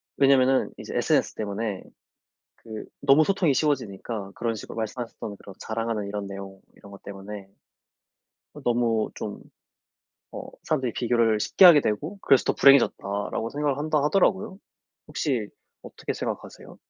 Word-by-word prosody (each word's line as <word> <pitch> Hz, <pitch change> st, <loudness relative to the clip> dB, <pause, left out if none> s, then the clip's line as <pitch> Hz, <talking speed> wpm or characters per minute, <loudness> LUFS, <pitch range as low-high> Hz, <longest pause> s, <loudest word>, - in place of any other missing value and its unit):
왜냐면은 135 Hz, -1 st, +3 dB
이제 -, -, -8 dB
SNS -, -, +1 dB
때문에 105 Hz, -1 st, -4 dB, 0.7 s
그 110 Hz, -2 st, -9 dB, 0.2 s
너무 140 Hz, +2 st, +5 dB
소통이 180 Hz, -7 st, +2 dB
쉬워지니까 115 Hz, -8 st, -2 dB
그런 115 Hz, -1 st, -2 dB
식으로 110 Hz, -, -9 dB
말씀하셨던 110 Hz, -2 st, -5 dB
'그런 95 Hz, -, -13 dB
자랑하는 110 Hz, -2 st, -3 dB
이런 100 Hz, 0 st, -4 dB
내용 95 Hz, 0 st, -9 dB, 0.2 s
이런 100 Hz, -, -15 dB
것 100 Hz, -, -13 dB
때문에 100 Hz, 0 st, -9 dB, 1.2 s
너무 115 Hz, -2 st, +1 dB
좀 -, -, -6 dB, 0.9 s
어 -, -, -6 dB, 0.2 s
사람들이 130 Hz, -6 st, -1 dB
비교를 115 Hz, -2 st, +1 dB
쉽게 190 Hz, -, +3 dB
하게 170 Hz, -5 st, +9 dB
되고 150 Hz, -, -3 dB
그래서 135 Hz, -7 st, +4 dB
더 -, -, +2 dB
불행해졌다.'라고 115 Hz, -5 st, +3 dB
생각을 145 Hz, -1 st, -1 dB
한다 150 Hz, -1 st, 0 dB
하더라고요. 190 Hz, +5 st, +1 dB, 0.5 s
혹시 120 Hz, -9 st, -2 dB, 0.3 s
어떻게 -, -, -6 dB
생각하세요? -, -, -6 dB
115 Hz, 345 characters per minute, -25 LUFS, 105-140 Hz, 1.2 s, 하게